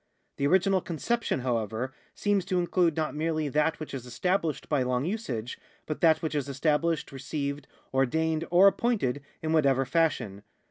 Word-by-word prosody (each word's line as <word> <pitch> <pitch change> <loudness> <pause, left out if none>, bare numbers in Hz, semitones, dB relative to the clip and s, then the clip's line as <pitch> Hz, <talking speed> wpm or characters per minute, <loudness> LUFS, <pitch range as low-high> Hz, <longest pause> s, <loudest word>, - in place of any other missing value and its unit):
The 140 - +1
original 190 +3 +3
conception, 185 - -1
however, 120 +1 -2 0.2
seems 205 -2 +1
to 190 -1 0
include 175 -2 +2
not 155 -1 -1
merely 155 0 -1
that 150 +3 +1
which 155 - -7
is 125 -2 -6
established 160 +6 -1
by 145 -3 +1
long 125 +1 0
usage, 135 - -4 0.3
but 155 - -5
that 160 -1 +4
which 160 - -1
is 145 -2 -2
established, 155 +3 0
received, 140 +1 -4 0.3
ordained, 160 +5 +1
or 180 +3 +6
appointed 200 - +2 0.2
in 160 0 0
whatever 135 -4 +3
fashion. 130 -9 0
155 Hz, 155 wpm, -28 LUFS, 135-170 Hz, 0.3 s, or